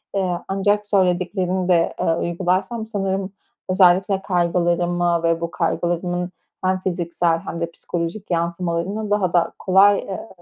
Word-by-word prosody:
Eee, 185 -3 0
ancak 205 +2 +1
söylediklerini 185 -1 +1
de, 170 -2 +3
eee, 165 - +2
uygularsam 185 +6 -1
sanırım 195 -2 -2 0.4
özellikle 190 +1 +4
kaygılarımı 175 -1 +1
ve 165 0 +1
bu 170 0 -3
kaygılarımın 175 +1 -1 0.3
hem 185 0 +1
fiziksel 175 -2 0
hem 170 0 -6
de 170 0 -2
psikolojik 175 +5 -5
yansımalarını 170 +4 -2
daha 190 -4 +1
da 175 - +2
kolay, 195 +2 +5
eee, 195 +3 -6
180 Hz, 125 wpm, -21 LUFS, 170-195 Hz, 0.4 s, kolay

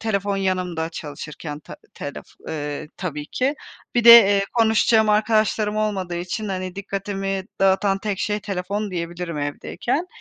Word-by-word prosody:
telefon 200 -2 -1
yanımda 180 -4 -1
çalışırken 150 -1 -7
ta - - -11 0.2
telef, 145 - -7 0.2
eee, 150 -1 -4
tabii 150 -5 -4
ki. 265 - 0 0.4
Bir 240 -1 +2
de, 235 - +11
eee, 200 -4 +8
konuşacağım 220 -1 +4
arkadaşlarım 215 0 +2
olmadığı 195 -5 -1
için, 180 +5 -4
hani, 185 -1 -4
dikkatimi 195 -1 -3 0.2
dağıtan 195 0 +3
tek 200 -1 -3
şey 210 -1 -1
telefon 200 +1 -3
diyebilirim 170 -2 -4
evdeyken. 240 - -2
195 Hz, 135 wpm, -22 LUFS, 175-215 Hz, 0.4 s, de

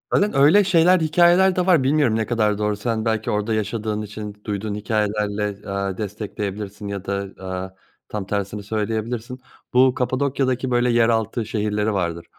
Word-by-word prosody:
Zaten 205 +1 +2
öyle 150 +9 +6
şeyler, 180 0 +4
hikâyeler 175 +4 +4
de 180 - +1
var. 175 -7 +4
Bilmiyorum 140 -4 +2
ne 110 0 0
kadar 105 -3 +1
doğru, 105 0 0
sen 110 +1 -2
belki 110 -1 0
orada 105 +2 -1
yaşadığın 110 0 -2
için 105 0 -7
duyduğun 105 0 -3
hikâyelerle, 105 -1 -2
aaa, 100 -1 -2
destekleyebilirsin 105 0 -5
ya 100 -1 -5
da, 100 -1 -4
aaa, 95 0 -4 0.4
tam 105 -2 -4
tersini 100 +1 -3
söyleyebilirsin. 110 +4 -3 0.3
Bu 130 0 +5
Kapadokya'daki 130 0 -1
böyle 120 0 +2
yeraltı 115 -1 +1
şehirleri 105 0 -1
vardır. 85 -3 -2
110 Hz, 150 wpm, -22 LUFS, 105-125 Hz, 0.4 s, öyle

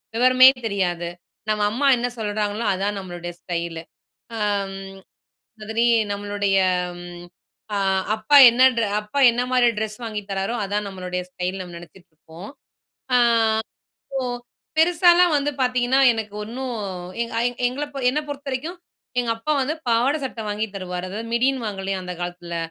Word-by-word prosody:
விவரமே 255 +2 +7 0.2
தெரியாது, 175 -4 -1 0.4
நம்ம 215 -1 0
அம்மா 275 +6 +1
என்ன 240 +1 -1
சொல்றாங்களோ! 210 +1 -2
அதான் 200 +2 -2
நம்மளுடைய 175 -2 -7
ஸ்டைலு. 170 -2 -4 0.6
அம் 200 -2 -1 0.8
அதுலே 220 +2 0 0.3
நம்மளுடைய 205 -1 0 1.2
அ - - 0 0.4
அப்பா 220 +7 +3
என்ன 245 +2 +2
ட்ர 230 - +2 0.2
அப்பா 210 +7 -3
என்னமாரி 245 +1 +2
ட்ரெஸ் 215 0 -4
வாங்கி 215 -2 -4
தராரோ! 195 +4 -2
அதான் 205 +1 -2
நம்மளுடைய 180 -1 -4
ஸ்டைல் 180 +1 -4
நம்ம 180 -2 -8
நினச்சிட்டுருப்போம். 170 0 -14 0.7
அ - - +6 1.0
சோ 270 - -1 0.6
பெருசாலாம் 345 0 +5
வந்து 290 0 0
பாத்தீங்கன்னா 250 +1 +2
எனக்கு 215 -2 -5
ஒண்ணு 240 +5 -6 0.6
எங்க 235 0 -6 0.3
எங்கள 275 +4 -4 0.3
என்ன 300 +4 -1
பொறுத்த 285 0 -6
வரைக்கும் 310 +8 -4 0.4
எங்க 235 - -2
அப்பா 265 +7 -2
வந்து 295 +4 -1
பாவாடை, 245 +6 +2
சட்டை 245 -4 -5
வாங்கி 210 +1 -1
தருவாரு. 180 -1 -5
அதாவது 225 +4 -6
மிடின்னு 255 +1 +1
வாங்கலையா! 195 -2 -3
அந்த 180 0 -5
காலத்துல. 175 -1 -5
215 Hz, 130 wpm, -22 LUFS, 190-250 Hz, 1.2 s, விவரமே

